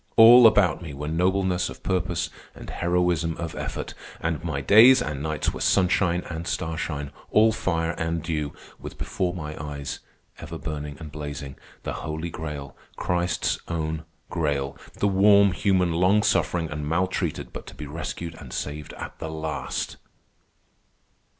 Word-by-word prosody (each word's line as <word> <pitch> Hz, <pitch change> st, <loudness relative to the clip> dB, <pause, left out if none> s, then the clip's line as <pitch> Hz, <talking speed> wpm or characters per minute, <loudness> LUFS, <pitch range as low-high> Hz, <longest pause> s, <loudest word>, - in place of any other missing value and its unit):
All 120 Hz, +1 st, +10 dB
about 100 Hz, -5 st, +3 dB
me 80 Hz, -5 st, -7 dB
were 75 Hz, +2 st, -5 dB
nobleness 90 Hz, +2 st, +1 dB
of -, -, -11 dB
purpose 90 Hz, -2 st, -1 dB, 0.2 s
and -, -, -9 dB
heroism 85 Hz, -2 st, +1 dB
of 85 Hz, -1 st, -4 dB
effort, -, -, -5 dB, 0.3 s
and 80 Hz, -3 st, -2 dB
my -, -, -2 dB
days 120 Hz, +6 st, +8 dB
and 75 Hz, -2 st, -3 dB
nights 75 Hz, 0 st, -1 dB
were -, -, -7 dB
sunshine 90 Hz, -2 st, +3 dB
and 85 Hz, 0 st, -5 dB
starshine, 80 Hz, -4 st, -3 dB, 0.2 s
all 110 Hz, +1 st, +5 dB
fire 85 Hz, -6 st, 0 dB
and 80 Hz, 0 st, -1 dB
dew, 75 Hz, -3 st, -2 dB, 0.3 s
with -, -, -8 dB
before 90 Hz, -1 st, -1 dB
my 75 Hz, -3 st, -5 dB
eyes, 70 Hz, -1 st, -5 dB, 0.4 s
ever 80 Hz, +1 st, -7 dB
burning 75 Hz, -3 st, -5 dB
and 75 Hz, -2 st, -8 dB
blazing, 70 Hz, -2 st, -6 dB, 0.3 s
the -, -, -3 dB
Holy 80 Hz, +2 st, -4 dB
Grail, 75 Hz, -4 st, -6 dB, 0.2 s
Christ's 90 Hz, 0 st, 0 dB
own 80 Hz, -1 st, -2 dB, 0.3 s
Grail, 70 Hz, -4 st, -1 dB, 0.2 s
the 100 Hz, -, 0 dB
warm 100 Hz, 0 st, +6 dB
human, 90 Hz, -2 st, +2 dB
long 95 Hz, +5 st, +4 dB
suffering 85 Hz, -3 st, +1 dB
and 75 Hz, 0 st, -3 dB
maltreated 90 Hz, -1 st, -1 dB
but -, -, -8 dB
to -, -, -10 dB
be 75 Hz, -, -7 dB
rescued 80 Hz, +2 st, -5 dB
and 65 Hz, -5 st, -10 dB
saved 75 Hz, +3 st, -5 dB
at -, -, -8 dB
the 80 Hz, -, -4 dB
last." 80 Hz, 0 st, -3 dB
80 Hz, 150 wpm, -25 LUFS, 75-90 Hz, 0.4 s, All